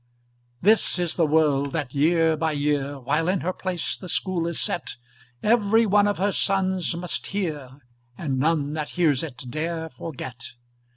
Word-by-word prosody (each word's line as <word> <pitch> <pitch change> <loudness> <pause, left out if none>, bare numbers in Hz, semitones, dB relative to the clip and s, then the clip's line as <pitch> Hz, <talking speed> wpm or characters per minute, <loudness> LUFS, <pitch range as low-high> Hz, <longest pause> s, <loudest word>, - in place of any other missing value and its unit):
This 215 +1 +4
is 175 -2 0
the 165 -3 +2
word 145 -3 +2
that 145 -6 -3
year 160 +2 +3
by 160 0 0
year, 145 -1 0
While 150 +6 0
in 185 0 +1
her 185 +2 -1
place 180 -3 -3
the 185 - -8
School 175 -1 0
is 170 - -2
set, 175 - -2 0.5
Every 225 0 +4
one 205 0 +4
of 205 - 0
her 200 +2 +1
sons 190 -3 0
must 175 +1 -3
hear, 150 -10 -4 0.4
And 135 -5 -2
none 150 0 +1
that 155 -1 -3
hears 150 -7 +3
it 145 -7 -6
dare 160 +2 -3
forget. 125 -4 -8
160 Hz, 165 wpm, -24 LUFS, 145-185 Hz, 0.5 s, This